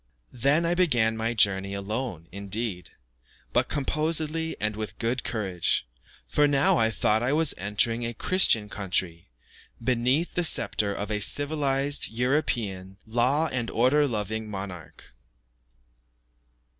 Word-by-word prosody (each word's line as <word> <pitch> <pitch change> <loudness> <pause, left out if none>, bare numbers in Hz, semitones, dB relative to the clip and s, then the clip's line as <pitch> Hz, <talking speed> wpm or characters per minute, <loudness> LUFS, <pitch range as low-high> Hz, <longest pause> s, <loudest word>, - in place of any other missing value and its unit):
Then 140 +7 +2
I 170 - +1
began 120 -11 +2
my 115 +1 -2
journey 100 -2 +2
alone, 100 -4 -4
indeed, 100 -1 -3 0.6
but - - +2
composedly 155 +2 -1
and 105 0 -1
with 110 -3 -6
good 120 +3 -2
courage, 95 -6 -1 0.4
for 150 0 +3
now 140 -1 +3
I 110 -1 +3
thought 110 0 +1
I 125 +4 0
was 160 0 +3
entering 105 +4 +1
a 120 0 -4
Christian 115 - +3
country, 90 -4 -1 0.5
beneath 130 +7 0
the 180 - +1
sceptre 105 -9 +3
of 100 +1 -4
a 105 - 0
civilized, 145 +2 +1
European, 110 -7 -2
law 125 +8 +1
and 120 -3 -1
order 140 +5 +2
loving 110 -1 -3
monarch. 95 -6 -9
115 Hz, 125 wpm, -26 LUFS, 100-140 Hz, 0.6 s, for